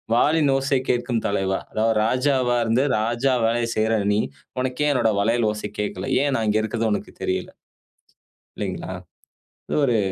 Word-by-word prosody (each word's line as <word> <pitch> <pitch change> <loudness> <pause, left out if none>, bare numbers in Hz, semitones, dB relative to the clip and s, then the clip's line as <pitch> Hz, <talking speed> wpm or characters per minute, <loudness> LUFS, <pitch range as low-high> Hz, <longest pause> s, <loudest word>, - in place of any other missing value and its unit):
வாலின் 150 +3 +3
ஓசை 135 0 +1
கேட்கும் 120 -1 0
தலைவா! 95 -1 0
அதாவது 110 +1 +1
ராஜாவா 130 0 +2
இருந்து 115 +5 +2
ராஜா 120 +4 +1
வேலைய 115 +1 +1
செய்றய 110 -1 +1
நீ! 105 - +2 0.4
உனக்கு 130 +2 -1
ஏன் - - +3
என்னோட 115 -4 +2
வளையல் 115 +2 +2
ஓச 105 - -7 0.2
கேட்கல. 105 +5 -3
ஏன் 145 - +1
நான் 110 -1 0
இங்க 110 - +2
இருக்கது 110 +1 -1
உனக்கு 105 - -3
தெரியல. - - -1 1.1
இல்லேங்களா? - - -4 0.8
இது - - 0
ஒரு 120 -4 +2
120 Hz, 155 wpm, -23 LUFS, 110-130 Hz, 1.1 s, வாலின்